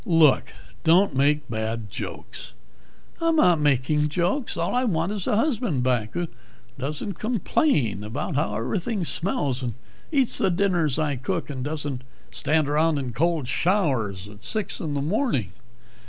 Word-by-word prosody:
"Look, 165 Hz, -, +4 dB, 0.3 s
don't 175 Hz, +1 st, +4 dB
make 145 Hz, +2 st, +2 dB
bad 110 Hz, -2 st, -3 dB
jokes 120 Hz, -, -7 dB, 0.3 s
" -, -, -30 dB
"I'm 330 Hz, -1 st, +3 dB
not 180 Hz, -, +5 dB
making 150 Hz, +1 st, +2 dB
jokes! 180 Hz, -, -1 dB
All -, -, -1 dB
I 250 Hz, -, +2 dB
want 175 Hz, -5 st, 0 dB
is 205 Hz, -3 st, -3 dB
a -, -, +2 dB
husband 225 Hz, -, +1 dB
back 120 Hz, -4 st, 0 dB
who 175 Hz, 0 st, -1 dB, 0.5 s
doesn't 155 Hz, +7 st, -4 dB
complain 195 Hz, -, +1 dB
about 140 Hz, -, -4 dB
how 105 Hz, -8 st, 0 dB
everything 185 Hz, -, -2 dB
smells, 145 Hz, -7 st, 0 dB
and 120 Hz, -3 st, -3 dB, 0.4 s
eats 270 Hz, -5 st, +5 dB
the -, -, +3 dB
dinners 175 Hz, -6 st, +1 dB
I 150 Hz, -3 st, 0 dB
cook, 130 Hz, +3 st, -3 dB
and 130 Hz, -2 st, -4 dB
doesn't 145 Hz, -3 st, -3 dB, 0.3 s
stand 155 Hz, -1 st, +1 dB
around 155 Hz, +2 st, +2 dB
in 130 Hz, -4 st, -3 dB
cold 160 Hz, +1 st, +1 dB
showers 130 Hz, -, 0 dB
at 105 Hz, +1 st, -14 dB
six 215 Hz, -, -3 dB
in 150 Hz, -3 st, -3 dB
the 140 Hz, -, -1 dB
morning." 160 Hz, -, 0 dB
150 Hz, 155 wpm, -25 LUFS, 130-185 Hz, 0.5 s, not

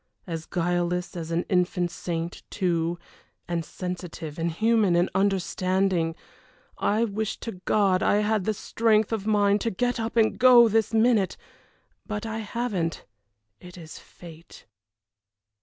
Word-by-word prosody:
As 165 Hz, -3 st, -6 dB
guileless 175 Hz, 0 st, -1 dB
as 165 Hz, -2 st, -5 dB
an 170 Hz, +1 st, 0 dB
infant 180 Hz, -1 st, 0 dB
saint, 170 Hz, 0 st, -4 dB
too 170 Hz, -3 st, -1 dB, 0.5 s
and 170 Hz, -1 st, -2 dB
sensitive 170 Hz, -2 st, -6 dB
and 165 Hz, +1 st, 0 dB
human 215 Hz, 0 st, +2 dB
and 175 Hz, +1 st, +2 dB
understanding. 185 Hz, -3 st, 0 dB, 0.6 s
I 215 Hz, +3 st, +1 dB
wish 215 Hz, 0 st, -3 dB
to 190 Hz, -6 st, -7 dB
God 195 Hz, -3 st, +2 dB
I 205 Hz, -, +3 dB
had 210 Hz, -2 st, 0 dB
the 215 Hz, -, +1 dB
strength 220 Hz, 0 st, +1 dB
of 215 Hz, -2 st, -3 dB
mind 205 Hz, -1 st, +3 dB
to 230 Hz, -, 0 dB
get 245 Hz, +4 st, -1 dB
up 225 Hz, +1 st, -3 dB
and 220 Hz, -1 st, +3 dB
go 245 Hz, -1 st, +8 dB
this 220 Hz, 0 st, +1 dB
minute 225 Hz, -3 st, +2 dB, 0.7 s
but 210 Hz, 0 st, -4 dB
I 220 Hz, 0 st, -4 dB
haven't 210 Hz, -6 st, -3 dB, 0.5 s
it 180 Hz, 0 st, -13 dB
is 160 Hz, -2 st, -10 dB
fate." 165 Hz, -1 st, -14 dB
190 Hz, 140 wpm, -26 LUFS, 175-220 Hz, 0.7 s, go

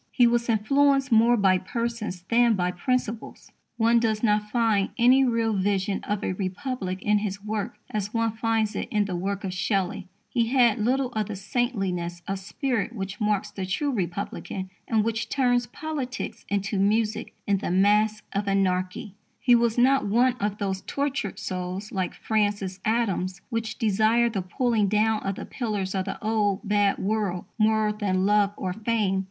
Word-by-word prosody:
He 245 Hz, -, +4 dB
was 235 Hz, 0 st, +2 dB
influenced 275 Hz, +5 st, +3 dB
more 230 Hz, +2 st, +5 dB
by 190 Hz, -3 st, +4 dB
persons 230 Hz, -3 st, -4 dB
than 235 Hz, +3 st, +3 dB
by 180 Hz, -1 st, 0 dB
principles. 230 Hz, +3 st, -3 dB, 0.3 s
One 230 Hz, +1 st, +4 dB
does 220 Hz, -1 st, 0 dB
not 210 Hz, -1 st, +2 dB
find 220 Hz, -4 st, +2 dB
any 255 Hz, +3 st, +5 dB
real 230 Hz, -3 st, +1 dB
vision 195 Hz, 0 st, 0 dB
of 205 Hz, 0 st, -2 dB
a -, -, -1 dB
Republic 190 Hz, 0 st, -4 dB
in 210 Hz, 0 st, +3 dB
his 200 Hz, -1 st, -4 dB
work 210 Hz, -1 st, -3 dB, 0.2 s
as 210 Hz, -1 st, -2 dB
one 230 Hz, -1 st, +1 dB
finds 225 Hz, -1 st, 0 dB
it -, -, -3 dB
in 210 Hz, -1 st, +1 dB
the 190 Hz, -2 st, -3 dB
work 195 Hz, +3 st, -3 dB
of 190 Hz, -2 st, -3 dB
Shelley. 190 Hz, -1 st, -1 dB, 0.2 s
He 230 Hz, -1 st, 0 dB
had 240 Hz, -3 st, +3 dB
little 255 Hz, +4 st, +1 dB
of 215 Hz, -3 st, -2 dB
the 215 Hz, -, -5 dB
saintliness 190 Hz, -5 st, -2 dB
of 195 Hz, 0 st, -2 dB
spirit 240 Hz, +3 st, -2 dB
which 195 Hz, +1 st, -5 dB
marks 210 Hz, -1 st, 0 dB
the 195 Hz, -, -5 dB
true 205 Hz, +11 st, -1 dB
Republican 190 Hz, -1 st, -4 dB, 0.2 s
and 220 Hz, -2 st, +2 dB
which 225 Hz, 0 st, -2 dB
turns 245 Hz, -3 st, +2 dB
politics 285 Hz, 0 st, -5 dB
into 200 Hz, 0 st, -1 dB
music 215 Hz, +2 st, 0 dB
in 200 Hz, -1 st, +1 dB
The -, -, -3 dB
Masque 210 Hz, +4 st, +3 dB
of 200 Hz, +1 st, -1 dB
Anarchy. 185 Hz, 0 st, 0 dB, 0.3 s
His 245 Hz, -2 st, +5 dB
was 235 Hz, -1 st, +1 dB
not 260 Hz, -1 st, +4 dB
one 240 Hz, +5 st, +3 dB
of 205 Hz, 0 st, -1 dB
those 195 Hz, -2 st, -2 dB
tortured 270 Hz, -8 st, -2 dB
souls, 185 Hz, +3 st, -4 dB
like 190 Hz, -2 st, -2 dB
Francis 205 Hz, -3 st, -1 dB
Adams's, 195 Hz, -5 st, 0 dB
which 225 Hz, -1 st, -3 dB
desire 225 Hz, +2 st, +2 dB
the 200 Hz, -3 st, -2 dB
pulling 215 Hz, +3 st, +1 dB
down 215 Hz, +2 st, +2 dB
of 195 Hz, 0 st, -2 dB
the -, -, -7 dB
pillars 205 Hz, -6 st, -3 dB
of 190 Hz, -1 st, -1 dB
the 195 Hz, -, -4 dB
old, 210 Hz, -1 st, 0 dB
bad 205 Hz, -1 st, +2 dB
world 200 Hz, -3 st, -1 dB
more 215 Hz, 0 st, +3 dB
than 190 Hz, -3 st, 0 dB
love 205 Hz, 0 st, +3 dB
or 185 Hz, -2 st, -3 dB
fame. 215 Hz, -2 st, 0 dB
210 Hz, 170 wpm, -26 LUFS, 195-230 Hz, 0.3 s, more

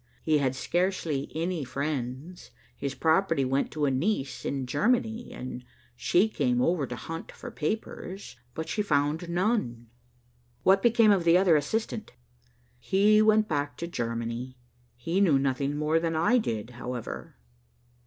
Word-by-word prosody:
He 155 Hz, -2 st, +3 dB
had 135 Hz, -2 st, 0 dB
scarcely 170 Hz, -2 st, -1 dB
any 165 Hz, -1 st, -1 dB
friends. 135 Hz, +4 st, -4 dB, 0.3 s
His 140 Hz, -1 st, -4 dB
property 165 Hz, -3 st, +2 dB
went 135 Hz, +2 st, 0 dB
to 150 Hz, -1 st, 0 dB
a 140 Hz, -, +2 dB
niece 135 Hz, -, -1 dB
in 135 Hz, -2 st, -2 dB
Germany, 225 Hz, -, 0 dB
and 125 Hz, 0 st, -7 dB, 0.3 s
she 180 Hz, -, +3 dB
came 125 Hz, -, 0 dB
over 150 Hz, +1 st, +1 dB
to 125 Hz, -, -5 dB
hunt 165 Hz, +8 st, -7 dB
for -, -, -9 dB
papers, 195 Hz, +2 st, -4 dB, 0.2 s
but 160 Hz, -, -4 dB
she 210 Hz, -, -1 dB
found 155 Hz, -2 st, 0 dB
none." 170 Hz, -, -1 dB, 0.7 s
"What 190 Hz, +1 st, +5 dB
became 230 Hz, -1 st, +5 dB
of 195 Hz, -4 st, +3 dB
the 170 Hz, +1 st, +5 dB
other 180 Hz, -3 st, +5 dB
assistant?" 215 Hz, +9 st, -2 dB, 0.7 s
"He 205 Hz, -, +4 dB
went 215 Hz, 0 st, +4 dB
back 145 Hz, -2 st, -2 dB
to 170 Hz, -, -4 dB
Germany. 115 Hz, -2 st, -4 dB, 0.4 s
He 165 Hz, +10 st, -1 dB
knew 165 Hz, -8 st, +5 dB
nothing 140 Hz, +1 st, 0 dB
more 155 Hz, +2 st, +2 dB
than 165 Hz, -1 st, -1 dB
I 205 Hz, +11 st, +3 dB
did, 115 Hz, -, -3 dB
however." 120 Hz, -1 st, -6 dB
155 Hz, 145 wpm, -28 LUFS, 130-190 Hz, 0.7 s, What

